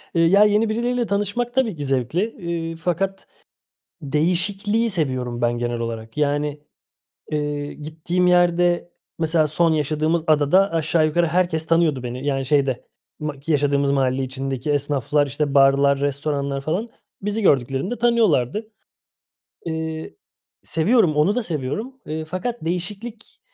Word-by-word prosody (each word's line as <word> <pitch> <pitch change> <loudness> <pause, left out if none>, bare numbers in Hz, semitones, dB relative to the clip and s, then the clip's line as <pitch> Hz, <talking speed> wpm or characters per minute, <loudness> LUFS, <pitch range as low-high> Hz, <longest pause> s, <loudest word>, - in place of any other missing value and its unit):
Ya 170 +5 +5
yeni 210 +1 +2
birileriyle 240 +2 0
tanışmak 205 +4 -1
tabii 250 -7 +1
ki 145 -2 -5
zevkli, 135 +5 0 0.2
eee, 170 -2 -3
fakat 185 +4 -2 0.7
değişikliği 185 +9 0
seviyorum 130 - -2
ben 120 0 +2
genel 120 0 -2
olarak. 115 +1 -5
Yani, 145 0 0 0.7
eee, 145 -1 -2
gittiğim 160 +4 -2
yerde, 175 0 +3 0.3
mesela 160 -1 +2
son 165 +2 +2
yaşadığımız 155 +2 0
adada 155 +6 +4
aşağı 160 0 +2
yukarı 170 +2 +1
herkes 165 -1 0
tanıyordu 165 -5 +2
beni 125 +2 -5
yani 135 -2 0
şeyde, 135 -2 +1 0.3
ma 150 -2 -4
ki 150 +4 -3
yaşadığımız 140 -1 +2
mahalle 135 -1 +1
içindeki 135 +1 -3
esnaflar, 145 0 +1
işte 145 +1 -2
barlar, 140 0 +4
restoranlar 140 -1 -2
falan. 175 +11 -2 0.3
Bizi 210 +2 -2
gördüklerinde 140 - +1
tanıyorlardı. 220 - +1 0.9
Eee, 160 - -4 0.5
seviyorum, 170 0 +2
onu 155 +8 +3
da 245 - 0
seviyorum, 170 - -4
eee, 155 +1 -4
fakat 185 +6 -4
değişiklik, 205 +6 -5
155 Hz, 125 wpm, -22 LUFS, 140-185 Hz, 0.9 s, Ya